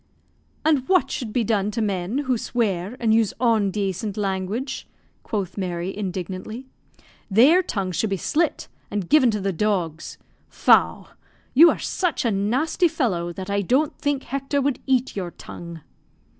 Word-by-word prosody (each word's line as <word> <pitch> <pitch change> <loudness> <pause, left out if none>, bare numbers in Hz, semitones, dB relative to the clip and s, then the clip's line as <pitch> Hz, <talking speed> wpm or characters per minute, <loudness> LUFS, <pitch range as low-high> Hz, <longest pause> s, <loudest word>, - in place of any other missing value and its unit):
"And 295 -5 +2
what 370 -2 +3
should 235 -4 -4
be 240 +1 +1
done 205 -2 +1
to 230 - -3
men 200 +1 -1
who 255 -1 +1
swear 220 -2 -2
and 225 -2 +2
use 225 -2 +2
ondacent 205 -3 0
language?" 205 +7 -3 0.3
quoth 200 -3 -4
Mary, 180 0 -3
indignantly. 190 +4 -5 0.6
"Their 265 - +6
tongues 190 - -3
should 220 - 0
be 195 - -1
slit, 315 - 0 0.2
and 200 -4 -3
given 290 -5 +5
to 210 -2 -1
the 195 -1 -1
dogs. 175 -4 -2 0.3
Faugh! - - +3 0.4
You 330 +6 +8
are - - 0
such 355 -9 -1
a 230 - +2
nasty 250 - +1
fellow 215 - -1
that 190 +2 -6
I 200 0 +1
don't 265 - +1
think 285 -2 -1
Hector 275 +2 -2
would 275 -2 0
eat 260 -1 +1
your 185 -3 -3
tongue." 170 -1 -10
215 Hz, 155 wpm, -23 LUFS, 190-260 Hz, 0.6 s, You